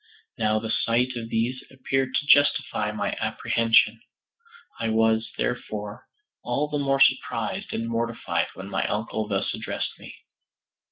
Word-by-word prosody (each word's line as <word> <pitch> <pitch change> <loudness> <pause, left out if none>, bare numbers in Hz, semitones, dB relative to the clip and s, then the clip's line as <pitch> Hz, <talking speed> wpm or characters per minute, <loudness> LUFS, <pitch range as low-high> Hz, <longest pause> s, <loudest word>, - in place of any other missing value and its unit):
Now 110 0 +1
the 110 0 -3
sight 125 +3 +1
of 115 -1 -5
these 120 +4 -1
appeared 130 0 -1
to - - 0
justify 145 0 +3
my - - -2
apprehension. 115 -1 +2 0.8
I 115 - -1
was, 110 0 +2
therefore, 105 -3 -4 0.4
all 140 +5 0
the 150 -1 -1
more 135 -1 +1
surprised - - +2
and 115 0 -2
mortified 115 0 -1
when 95 - -8
my - - -1
uncle 110 0 -2
thus 100 -2 -1
addressed - - -4
me. - - -11
115 Hz, 135 wpm, -25 LUFS, 110-130 Hz, 0.8 s, justify